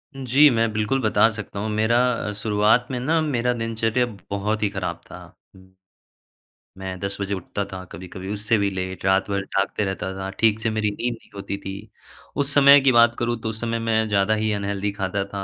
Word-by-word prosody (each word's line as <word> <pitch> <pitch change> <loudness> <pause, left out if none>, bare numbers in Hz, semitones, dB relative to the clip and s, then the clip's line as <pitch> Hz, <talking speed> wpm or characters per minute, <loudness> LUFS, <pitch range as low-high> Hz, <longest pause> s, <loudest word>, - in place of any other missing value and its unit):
जी, 135 +3 +5
मैं 115 -3 +1
बिल्कुल 110 +5 0
बता 110 -1 +4
सकता 105 -2 -7
हूँ। 110 +2 -2
मेरा 110 +2 +2 0.3
अ, - - -2
शुरुआत 105 +3 +3
में 125 - -2
ना, 155 +6 +1
मेरा 125 -5 0
दिनचर्या 115 +1 0 0.2
बहुत 105 +2 -1
ही 105 - +2
ख़राब 95 -2 -4
था। - - -9 1.5
मैं 95 -1 -5
10 100 +1 -4
बजे 100 0 -2
उठता 95 +2 -4
था, 95 -1 -6
कभी-कभी 95 +1 -8
उससे 105 +2 +1
भी 100 -1 +1
लेट, 95 0 -5
रात 95 +1 +2
भर 100 0 0
जागते 100 +2 0
रहता 95 -1 -3
था, 95 0 -4
ठीक 110 -1 +3
से 110 - -1
मेरी 110 -1 0
नींद 120 +4 -2
नहीं 115 - -16
होती 100 0 -5
थी। 95 - -7 0.6
उस 140 0 -1
समय 140 0 +8
की 135 -1 +4
बात 120 -1 +5
करूँ, 120 -1 -1
तो 110 - -3
उस 110 0 -6
समय 115 0 -1
मैं 110 -1 +1
ज़्यादा 100 +1 +2
ही 110 0 0
अनहेल्दी 100 0 -2
खाता 100 0 -2
था 100 -1 -3
110 Hz, 200 wpm, -23 LUFS, 100-115 Hz, 1.5 s, समय